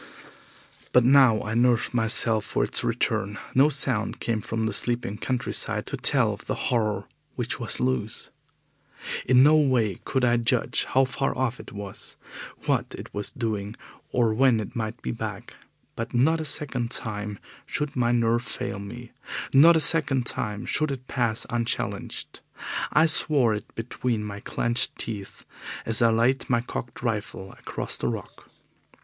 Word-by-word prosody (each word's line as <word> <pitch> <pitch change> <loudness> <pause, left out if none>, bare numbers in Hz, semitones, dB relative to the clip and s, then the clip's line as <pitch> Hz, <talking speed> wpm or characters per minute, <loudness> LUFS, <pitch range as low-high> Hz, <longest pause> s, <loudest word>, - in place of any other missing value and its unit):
But 125 - +6
now 125 -4 +5
I 105 - -4
nerved 120 0 +2
myself 110 -1 +4
for - - -1
its - - 0
return. 100 +2 -1 0.2
No 135 +3 +5
sound 130 -6 +1
came 115 -2 -1
from 110 +1 -2
the 110 - -1
sleeping 120 -1 -1
countryside 125 -2 -1
to - - -5
tell - - +3
of - - -11
the - - -1
horror 105 -5 -1 0.3
which 120 -1 -3
was 120 - -3
loose. 125 -4 -2 1.0
In 130 0 +6
no 150 +2 +6
way 125 - +2
could 130 -2 0
I 120 0 +3
judge 115 0 +1
how 135 +1 +3
far 130 +2 -2
off 125 -1 -1
it - - -11
was, 100 -2 -5 0.5
what - - 0
it - - -10
was 105 0 -2
doing, 110 -5 -3 0.4
or 115 -3 +2
when 125 0 +3
it 110 +4 -6
might 110 0 -4
be 65 - -2
back. - - -6 0.4
But 115 +2 -5
not 160 +7 +3
a - - -4
second 130 -5 -1
time 105 -4 -4 0.3
should 150 -1 -3
my 120 -2 +2
nerve 120 0 +2
fail 105 -3 -5
me, 115 +4 -9 0.4
not 160 +5 +8
a - - +3
second 145 -5 +3
time 105 0 -3
should 155 -1 0
it 130 -2 -5
pass 115 -2 -1
unchallenged. 120 -1 -3 0.5
I 155 - +5
swore 145 -7 +4
it 105 -1 -7
between 115 -1 -2
my 105 -1 -6
clenched 120 +3 0
teeth 105 -4 -5 0.4
as 115 0 +2
I 115 - +5
laid 120 +4 +1
my 120 -2 +2
cocked 120 0 -7
rifle 105 -4 -3
across - - -4
the - - -2
rock. - - -6
120 Hz, 160 wpm, -25 LUFS, 110-130 Hz, 1.0 s, not